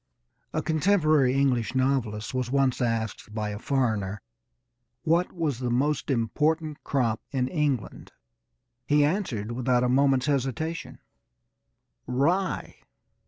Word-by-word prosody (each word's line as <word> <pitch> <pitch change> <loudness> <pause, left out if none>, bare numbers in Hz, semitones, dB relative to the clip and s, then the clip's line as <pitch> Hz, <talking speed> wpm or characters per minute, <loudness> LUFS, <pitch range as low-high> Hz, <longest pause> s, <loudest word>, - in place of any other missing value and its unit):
A - - -2
contemporary 155 -5 +3
English 130 -4 +1
novelist 130 -4 0
was 130 -1 -1
once 135 -1 +1
asked 110 -2 -2
by 105 -1 -2
a 105 0 -5
foreigner 110 -8 -1 0.8
what 170 +2 +2
was 155 -8 -2
the 125 -1 -2
most 135 +4 0
important 150 +5 0
crop 120 -6 0
in 130 -3 0
England. 145 - -2 0.8
He 145 0 +4
answered 140 - -2
without 125 0 +1
a 125 - +2
moment's 135 0 +3
hesitation: 145 +3 -2 1.1
"Rye." 165 +10 0
130 Hz, 115 wpm, -26 LUFS, 120-150 Hz, 1.1 s, He